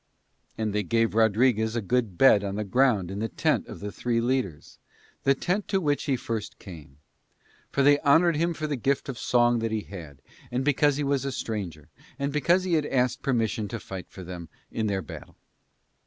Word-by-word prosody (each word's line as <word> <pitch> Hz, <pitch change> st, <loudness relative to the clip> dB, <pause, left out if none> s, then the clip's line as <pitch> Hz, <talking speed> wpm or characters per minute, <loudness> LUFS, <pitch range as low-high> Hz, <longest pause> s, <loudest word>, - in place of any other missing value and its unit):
And 110 Hz, -2 st, -1 dB
they 105 Hz, -, +1 dB
gave 115 Hz, +3 st, +1 dB
Rodriguez 110 Hz, +1 st, +3 dB
a -, -, +1 dB
good 115 Hz, -4 st, 0 dB
bed 110 Hz, -6 st, +6 dB
on 100 Hz, -1 st, -3 dB
the 105 Hz, -, -2 dB
ground 105 Hz, -3 st, +2 dB
in 100 Hz, -, -4 dB
the 110 Hz, -, -1 dB
tent -, -, 0 dB
of -, -, -9 dB
the 105 Hz, 0 st, -4 dB
three 120 Hz, +1 st, -1 dB
leaders, 120 Hz, -, -2 dB, 0.5 s
the 135 Hz, -, +5 dB
tent 185 Hz, +8 st, -1 dB
to 195 Hz, -, +1 dB
which 145 Hz, -5 st, 0 dB
he 140 Hz, -3 st, +1 dB
first 115 Hz, -3 st, -4 dB
came; 75 Hz, -7 st, -12 dB, 0.7 s
for 140 Hz, -, +1 dB
they 145 Hz, +1 st, +6 dB
honoured 160 Hz, +4 st, +4 dB
him 170 Hz, +2 st, 0 dB
for 155 Hz, -, -3 dB
the 150 Hz, -1 st, -1 dB
gift 135 Hz, +3 st, -1 dB
of 125 Hz, -, -5 dB
song 120 Hz, -1 st, +3 dB
that 115 Hz, -1 st, -2 dB
he 110 Hz, -1 st, -1 dB
had, 80 Hz, -10 st, -11 dB, 0.3 s
and 125 Hz, +2 st, -2 dB
because 145 Hz, 0 st, +3 dB
he 150 Hz, -, -1 dB
was 140 Hz, -1 st, 0 dB
a 135 Hz, -, -2 dB
stranger, 95 Hz, -, -5 dB, 0.3 s
and 140 Hz, 0 st, -2 dB
because 170 Hz, +5 st, +3 dB
he 185 Hz, -2 st, -1 dB
had 155 Hz, -2 st, +2 dB
asked 125 Hz, -2 st, 0 dB
permission 115 Hz, -5 st, 0 dB
to 115 Hz, +2 st, -5 dB
fight 95 Hz, -2 st, -8 dB
for 95 Hz, -, -10 dB
them 85 Hz, -2 st, -8 dB, 0.2 s
in 110 Hz, -1 st, -1 dB
their 95 Hz, -2 st, -1 dB
battle. -, -, -10 dB
115 Hz, 205 wpm, -26 LUFS, 100-140 Hz, 0.7 s, bed